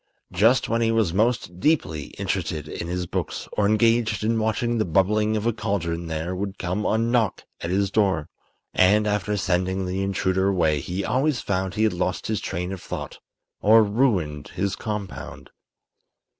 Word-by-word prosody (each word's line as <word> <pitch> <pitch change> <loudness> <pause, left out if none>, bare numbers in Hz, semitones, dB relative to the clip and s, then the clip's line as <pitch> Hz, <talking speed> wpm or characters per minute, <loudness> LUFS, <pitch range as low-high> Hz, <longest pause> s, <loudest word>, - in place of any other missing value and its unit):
Just 115 +5 +3
when 115 0 0
he 115 -1 +2
was 110 -7 +1
most 105 -4 0
deeply 85 - +1
interested 75 -1 -2
in 85 - -5
his 90 +1 -2
books - - -4
or 100 - +2
engaged 110 0 +2
in 115 +1 +1
watching 115 +2 0
the - - +3
bubbling 105 +5 +2
of 105 - -3
a 120 - +2
cauldron 85 -6 -2
there 80 +3 -3
would 100 +1 -4
come 90 +4 -2
a 110 - +2
knock 115 -3 +1 0.2
at 85 - -4
his 100 +1 +1
door. 95 -8 +1 0.5
And 105 +3 +4
after 105 0 0
sending 95 0 0
the 95 +1 -2
intruder 95 -1 +1
away 80 -6 +2
he 90 +7 -3
always 130 +3 +1
found 95 -1 -2
he 110 - +1
had 110 - +3
lost 90 +1 -2
his 110 -2 -1
train 90 +2 -3
of 95 - -6
thought - - -6 0.4
or 110 +2 +6
ruined 100 - 0
his 100 +1 -2
compound. 105 -4 -6
100 Hz, 170 wpm, -24 LUFS, 90-110 Hz, 0.5 s, or